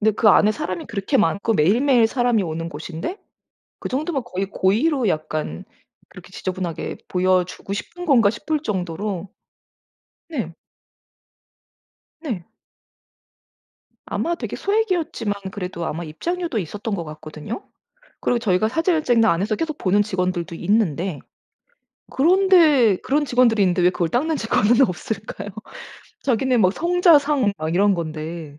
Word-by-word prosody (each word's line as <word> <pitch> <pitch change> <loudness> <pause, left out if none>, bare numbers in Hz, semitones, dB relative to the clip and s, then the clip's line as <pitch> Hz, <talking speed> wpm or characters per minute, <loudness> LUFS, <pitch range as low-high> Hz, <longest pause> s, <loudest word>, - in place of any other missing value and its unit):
네 220 +1 +4
그 215 +1 +3
안에 210 +2 +6
사람이 185 -4 -4
그렇게 200 -4 -1
많고 200 +7 +1
매일매일 230 - +4
사람이 240 -2 +1
오는 165 -1 -4
곳인데 165 - -6 0.6
그 - - -5
정도면 280 +1 -2
거의 195 -4 -3
'고의로 245 +9 +1
약간 155 - -3 0.4
그렇게 - - -14
지저분하게 185 -3 -4
보여주고 185 +1 0
싶은 350 - -7
건가?' 235 - +5
싶을 300 +7 -2
정도로 190 - -3 1.0
네. 235 - -4 1.7
네. 235 - -4 1.6
아마 340 - -1
되게 - - -5
소액이었지만 355 - 0 0.2
그래도 180 -3 -5
아마 170 +3 -4
입장료도 335 - -3
있었던 205 +4 -4
것 170 -4 -3
같거든요. 155 - -8 0.6
그리고 245 - +1
저희가 215 -1 +1
사진을 325 +4 +1
찍는 235 -4 +3
안에서 200 +4 +1
계속 310 +4 -3
보는 200 +2 +2
직원들도 180 -4 -2
있는데 180 -4 0 0.9
그런데 320 - +4
그런 295 +2 +1
직원들이 245 -4 +3
있는데 180 -1 +2
왜 180 - +5
그걸 175 -2 -1
닦는 310 - 0
직원은 225 0 +2
없을까요? 205 -1 -2 0.7
자기네 255 0 +1
막 185 -4 +4
성자상 300 - +3
막 155 +1 -3
이런 200 +2 +4
건데. 155 -2 -6
210 Hz, 305 characters per minute, -22 LUFS, 180-270 Hz, 1.7 s, 안에